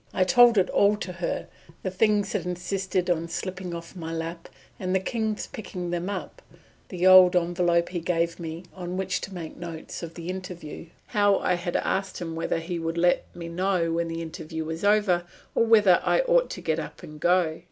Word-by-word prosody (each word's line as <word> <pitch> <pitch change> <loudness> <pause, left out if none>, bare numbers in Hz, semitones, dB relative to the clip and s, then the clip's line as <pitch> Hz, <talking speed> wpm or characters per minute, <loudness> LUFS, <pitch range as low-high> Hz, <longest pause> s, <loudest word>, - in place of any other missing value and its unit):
I 185 - +4
told 235 +4 +6
it 190 - +4
all 205 +1 +4
to 180 -3 -5
her, 170 0 -3 0.4
the 185 - -2
things 205 0 +2
that - - -1
insisted 180 +1 -2
on 170 -2 0
slipping 185 0 -4
off 170 +2 -9
my 165 -2 -6
lap, 165 +1 -5 0.3
and 185 0 -1
the - - +4
King's 220 +2 -2
picking 185 -8 -6
them 175 +2 -2
up; 200 -2 -6 0.5
the 180 -1 -2
old 185 -1 +8
envelope 175 0 +2
he 180 - -3
gave 170 0 -1
me 165 +1 -6
on 180 0 -5
which 190 0 -1
to 195 - -7
make 165 -3 -7
notes 165 -2 -7
of 165 -1 -7
the 170 -1 -7
interview; 180 -4 -7 0.2
how 205 -3 +3
I - - +1
had 175 0 -3
asked 195 -1 -1
him 165 -2 -5
whether 165 - -1
he 170 +1 -4
would 165 +1 -3
let 175 +1 +3
me 170 -1 -6
know 175 0 0
when 170 +1 0
the 165 0 -4
interview 160 0 -6
was 160 +3 -5
over, 205 -4 +3 0.3
or 230 - +3
whether 210 -6 +6
I - - +3
ought - - +3
to - - -6
get 160 0 0
up - - -8
and 150 0 -10
go! 175 -2 +2
180 Hz, 205 wpm, -26 LUFS, 170-190 Hz, 0.5 s, old